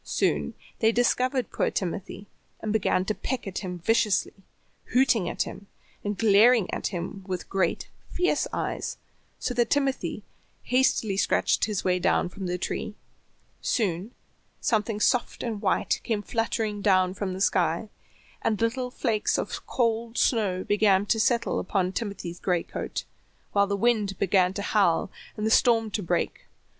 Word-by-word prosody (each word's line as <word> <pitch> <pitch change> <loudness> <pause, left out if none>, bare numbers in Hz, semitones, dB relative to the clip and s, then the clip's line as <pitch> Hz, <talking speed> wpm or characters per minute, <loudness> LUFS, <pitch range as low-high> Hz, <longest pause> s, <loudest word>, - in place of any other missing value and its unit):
Soon - - 0 0.2
they 220 0 +4
discovered 250 +2 +1
poor - - +1
Timothy, 195 +2 -4 0.3
and 215 - -2
began 190 -3 +1
to 215 - 0
peck 255 +3 -4
at 195 -2 -4
him 180 -2 -5
viciously, 210 +1 +1 0.6
hooting 235 -8 +3
at - - -1
him, 200 - -9 0.4
and 205 -1 -2
glaring 220 0 +5
at - - -1
him 185 +1 -5
with 185 -2 -4
great, 190 -3 0 0.2
fierce 360 +1 +1
eyes, - - -3 0.4
so 250 - -2
that 240 -1 +1
Timothy 275 -2 0 0.4
hastily 245 -5 +2
scratched - - +2
his 210 -3 -2
way 180 -1 +2
down 180 - +2
from 190 0 -6
the 180 0 -1
tree. 210 - -4 0.7
Soon 195 -1 -1 0.5
something 215 -1 0
soft 245 +3 +1
and 225 -4 -3
white - - +1
came 215 -3 -1
fluttering 225 -2 -1
down 185 -2 +3
from 195 -1 -3
the 185 - -6
sky, 180 0 +1 0.5
and 215 - 0
little 245 +2 0
flakes 225 -4 0
of - - -4
cold 230 -1 0
snow 195 -6 +2
began 205 -2 +3
to 225 +2 +1
settle 235 +1 +1
upon 185 -1 0
Timothy's 195 -5 -5
gray 180 -3 0
coat, - - -5 0.5
while 200 0 +3
the 200 0 -1
wind 210 -3 +1
began 185 -1 +3
to 200 - -3
howl, 195 -4 +2 0.3
and 215 - -2
the 220 - +1
storm 225 -2 +4
to 210 - -1
break. 175 - -2
210 Hz, 155 wpm, -26 LUFS, 190-230 Hz, 0.7 s, glaring